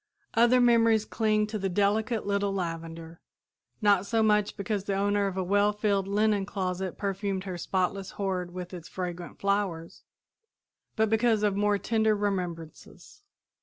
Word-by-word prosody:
Other 240 +2 +5
memories 230 -3 +4
cling 215 -1 +1
to 215 0 -4
the 195 0 -1
delicate 210 +4 0
little 200 0 0
lavender, 165 -2 -5 0.6
not 200 -2 +4
so 225 0 +2
much 210 -1 +2
because 200 -1 -2
the 200 - -1
owner 200 0 +1
of 190 -1 -4
a 190 - 0
well 205 +3 +3
filled 200 -2 0
linen 205 0 +2
closet 190 -2 -3
perfumed 195 -1 -2
her 190 -2 -5
spotless 190 +2 -2
hoard 185 -3 -2
with 180 0 -7
its 175 -2 -8
fragrant 175 -2 -6
flowers, 200 -5 -2 0.9
but 220 -1 +2
because 225 -1 +2
of 205 -2 +2
more 205 0 +2
tender 220 +1 +1
remembrances. 180 - -5
200 Hz, 150 wpm, -28 LUFS, 185-210 Hz, 0.9 s, Other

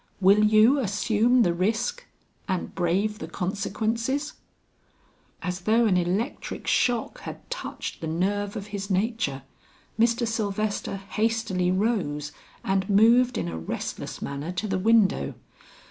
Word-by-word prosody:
Will 200 +2 +5
you 215 +6 +5
assume 225 +2 +2
the 175 - +2
risk 225 - -1 0.4
and 185 -2 -2
brave 195 +4 0
the 160 - -6
consequences?" 225 - -2 1.1
As 180 0 -2
though 220 +5 +3
an 200 -4 +3
electric 185 +9 -2
shock 245 - +1
had - - -9
touched - - -5
the 160 - -3
nerve 200 +5 -1
of 200 - -5
his 200 0 -4
nature, 190 - -1 0.6
Mr. 235 +1 +3
Sylvester 215 -2 -2
hastily 195 -2 -1
rose 180 -8 0 0.3
and 195 0 0
moved 235 +5 +5
in 85 - -2
a 80 -1 -4
restless 80 - -5
manner 140 +4 -4
to 185 +4 -3
the 190 -2 -1
window. 220 0 +3
205 Hz, 130 wpm, -26 LUFS, 185-225 Hz, 1.1 s, Will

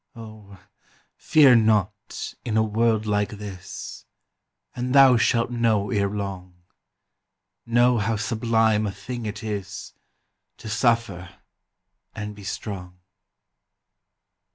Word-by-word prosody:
Oh, 110 -4 -12 0.6
fear 140 -5 +5
not 105 -3 0
in 110 -3 -1
a 110 - +4
world 110 0 +1
like 105 -1 0
this, 100 -3 -9 0.7
And 125 +2 -2
thou 135 -2 +8
shalt 115 +1 +1
know 110 -4 +1
ere 100 -1 +1
long, 95 -3 -6 1.0
Know 120 +1 +3
how 110 +2 0
sublime 110 0 +1
a - - -2
thing 110 +4 -6
it 105 +3 -6
is 100 -4 -6 0.6
To - - -11
suffer 115 -5 0 0.9
and 105 0 -5
be 105 -1 -13
strong. 95 -3 -6
110 Hz, 105 wpm, -24 LUFS, 100-115 Hz, 1.0 s, thou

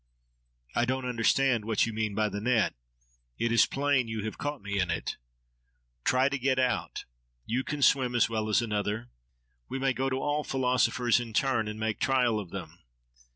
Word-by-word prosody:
—I 120 - +2
don't 130 +1 -2
understand 125 0 +2
what 110 -1 +2
you 115 - -4
mean 110 -2 -2
by 110 0 +2
the 105 0 -4
net. 115 -2 +2 0.6
It 115 - 0
is 115 -2 +5
plain 140 -3 +1
that - - -6
you 110 -2 -3
have 110 - -5
caught 145 -5 -4
me 100 0 -2
in 90 -2 +1
it. 85 - -3 0.9
—Try 130 +1 +3
to 140 0 -2
get 130 +1 +1
out! 125 -2 -1 0.4
You 125 +3 -1
can 145 0 -3
swim 125 -3 +3
as 120 - +4
well 110 -1 -2
as 110 +3 +3
another. 105 +1 -2 0.6
We 135 - -3
may 135 0 +1
go 135 +1 -1
to 130 0 -1
all 150 +1 -1
philosophers 125 -2 +2
in 115 -2 -6
turn 115 -2 +1
and 105 0 -5
make 110 -2 -2
trial 125 -5 +2
of 100 -4 -7
them. 85 -2 -8
120 Hz, 195 wpm, -29 LUFS, 110-130 Hz, 0.9 s, is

